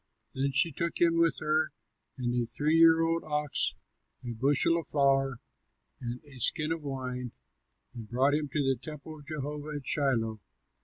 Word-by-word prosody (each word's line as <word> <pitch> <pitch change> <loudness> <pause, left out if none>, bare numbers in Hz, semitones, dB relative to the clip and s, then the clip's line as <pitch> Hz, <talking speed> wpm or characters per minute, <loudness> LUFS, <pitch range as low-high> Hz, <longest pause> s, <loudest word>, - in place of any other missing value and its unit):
Then 135 +1 0
she 150 +5 +3
took 170 +4 -2
him 165 -1 +4
with 165 -1 +4
her, 155 0 +1 0.4
and 120 -2 -1
a 120 -1 0
three 150 +7 0
year 165 0 +7
old 165 0 0
ox, 150 -2 0 0.5
a 120 - -3
bushel 145 +7 +3
of 160 - -8
flour, 135 -3 +2 0.6
and 120 -1 -5
a 140 -3 -12
skin 150 +6 +1
of 165 -1 -2
wine, 130 -3 -4 0.6
and 115 -4 -9
brought 130 +4 +2
him 150 -1 0
to 145 0 0
the 135 -3 +1
temple 155 +1 -9
of 145 - -16
Jehovah 150 0 -5
at 140 - -9
Shiloh. 115 -7 0
145 Hz, 170 wpm, -30 LUFS, 130-155 Hz, 0.6 s, year